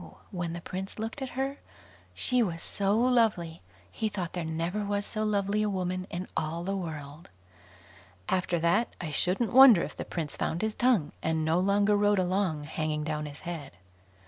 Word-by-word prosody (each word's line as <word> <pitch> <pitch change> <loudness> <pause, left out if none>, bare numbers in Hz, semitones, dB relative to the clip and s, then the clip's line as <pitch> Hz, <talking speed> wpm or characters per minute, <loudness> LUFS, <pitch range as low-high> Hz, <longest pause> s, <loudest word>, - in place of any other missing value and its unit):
when 175 -3 -3
the 170 - -6
Prince 190 +3 -6
looked 225 +5 -4
at 265 - -3
her, 270 +1 -2 0.6
she 250 -1 +2
was 170 -7 -2
so 200 +1 0
lovely, 225 -10 +2 0.3
he 220 - -2
thought 185 -5 -4
there 175 - -2
never 165 +6 -2
was 205 0 -1
so 215 -1 -2
lovely 205 0 +1
a 210 - +1
woman 185 -1 -2
in 180 +2 -4
all 160 +2 -2
the 195 +2 -2
world. 155 -4 -6 1.0
After 180 -1 +1
that, 170 +8 +1
I 165 -3 -4
shouldn't 190 +10 +1
wonder 250 -8 +9
if 150 - -6
the - - -4
Prince 160 -4 -4
found 170 - -2
his 220 0 0
tongue, 230 -13 +2
and 160 -1 0
no 160 +2 +2
longer 200 +2 +3
rode 205 0 +3
along 185 -4 0
hanging 155 0 -2
down 150 -1 -2
his 145 0 -10
head. 165 - -6
185 Hz, 180 wpm, -29 LUFS, 165-210 Hz, 1.0 s, wonder